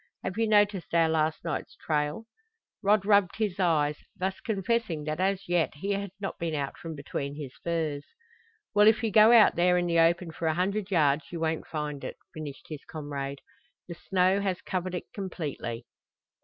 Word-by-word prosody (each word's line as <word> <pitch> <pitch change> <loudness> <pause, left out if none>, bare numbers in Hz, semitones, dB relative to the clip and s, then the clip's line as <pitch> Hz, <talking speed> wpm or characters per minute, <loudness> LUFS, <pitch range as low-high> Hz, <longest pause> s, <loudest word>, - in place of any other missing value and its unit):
Have 185 - -3
you 225 +1 +1
noticed 205 -5 +2
our 165 -1 +5
last 160 0 0
night's 165 - -4
trail?" 150 +5 -1 0.6
Rod 205 -1 +3
rubbed 200 -3 +4
his 210 -4 -2
eyes, 150 -5 +2 0.2
thus 190 +1 -2
confessing 205 -5 -1
that 155 +2 -3
as 195 +1 0
yet 175 -3 +1
he 195 +7 -3
had 200 0 -2
not 195 - -5
been 165 -2 -2
out 140 -2 -3
from 165 -1 -7
between 140 0 -4
his 145 -4 -7
furs. 160 -4 -1 0.7
"Well, 210 0 +6
if 220 +2 +4
you 225 - 0
go 215 +2 +7
out 230 -3 +7
there 180 +1 +3
in 175 - +1
the 170 -1 +2
open 170 +1 +3
for 165 +1 -3
a 160 - +1
hundred 195 +3 -1
yards 150 -5 +2
you 170 - -4
won't 160 0 -1
find 150 -2 -4
it," - - -6 0.2
finished 150 -3 -8
his 155 -3 -7
comrade. 140 -2 -5 0.5
"The 175 - -6
snow 185 +3 +1
has 190 -2 -2
covered 185 0 -3
it 180 - -4
completely." 150 - -5
170 Hz, 185 wpm, -28 LUFS, 155-195 Hz, 0.7 s, go